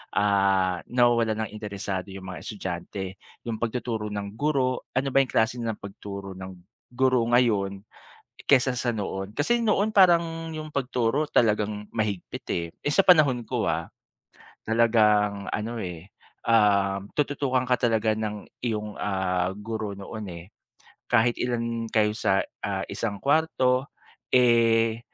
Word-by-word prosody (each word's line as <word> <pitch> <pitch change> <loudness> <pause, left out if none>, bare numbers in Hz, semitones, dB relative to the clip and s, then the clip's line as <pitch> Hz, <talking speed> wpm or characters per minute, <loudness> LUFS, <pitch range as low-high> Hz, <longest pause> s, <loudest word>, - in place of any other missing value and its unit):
ah, 95 -3 +2
nawa-walan 115 -3 +2
ng - - -11
interesado 100 -2 -4
yung 95 -1 -9
mga 95 -1 -7
estudyante, 95 -1 -5 0.3
yung 115 -2 -4
pag-tuturo 115 -2 -2
ng 100 -1 -5
guro, 130 0 0
ano 135 +1 +1
ba 135 - +6
yung 135 - -2
klase 115 +2 +1
ng 115 -2 -2
pag-turo 100 -1 -8
ng 95 0 -8 0.4
guro 130 0 +2
ngayon, 100 -5 +2 0.6
kesa 130 -2 +5
sa 125 0 -1
noon. 100 -3 -3
Kasi 235 +11 +2
noon 215 -1 +1
parang 170 -4 +4
yung 155 -1 -7
pag-turo 130 +1 0
talagang 105 -2 +1
mahigpit 105 -5 -3
eh, 85 - -1
eh, 145 - -1
sa 195 - +5
panahon 145 -9 +5
ko, - - -1
ah, - - -2 0.8
talagang 105 -3 +3
ano 110 +2 -3
eh, 90 -2 -7 0.4
ah, 100 -3 +3
tutu-tukan 140 -3 0
ka 125 - +4
talaga 110 -2 +2
ng 105 -2 -4 0.2
iyong, 105 -3 -2
ah, 95 -2 0
guro 110 +1 -5
noon 105 +2 -7
eh, 85 0 -9 0.7
kahit 120 0 +3
ilan 115 -1 -1
kayo 110 -1 +2
sa, 100 -2 +2 0.2
ah, - - -2
isang 100 -3 -3
kuwarto 140 -3 +2 0.5
eh, 115 -2 +4
110 Hz, 135 wpm, -26 LUFS, 100-125 Hz, 0.8 s, ba